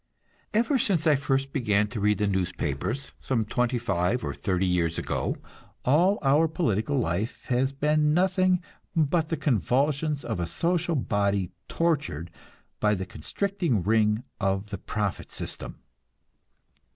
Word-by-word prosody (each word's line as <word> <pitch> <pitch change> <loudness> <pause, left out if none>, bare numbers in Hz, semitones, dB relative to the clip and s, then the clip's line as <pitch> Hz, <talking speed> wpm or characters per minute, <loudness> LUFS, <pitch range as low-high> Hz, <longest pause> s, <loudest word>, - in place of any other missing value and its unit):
Ever 240 +5 +2
since 185 -8 +1
I 155 -2 +5
first 135 0 0
began 105 -6 +2
to 115 - -4
read 105 +1 +2
the 105 - +1
newspapers, 95 - -2
some 115 -5 0
twenty 125 +3 0
five 100 0 0
or - - -2
thirty 95 -1 0
years 85 -2 +1
ago, - - -2 0.5
all 175 +10 +4
our 145 +4 +4
political 145 - 0
life 105 -1 -2
has 130 +2 +2
been 150 +2 +2
nothing 185 +1 +3 0.3
but 160 0 +2
the 165 - -1
convulsions 140 - +1
of 110 -6 -2
a 85 - -1
social 175 - 0
body 100 - 0 0.2
tortured 145 - -1 0.5
by 105 0 +3
the 95 -1 -4
constricting 175 - -1
ring 110 +2 +2 0.2
of 95 0 0
the - - -5
profit 105 -3 -3
system. - - -6
125 Hz, 140 wpm, -27 LUFS, 100-155 Hz, 0.5 s, I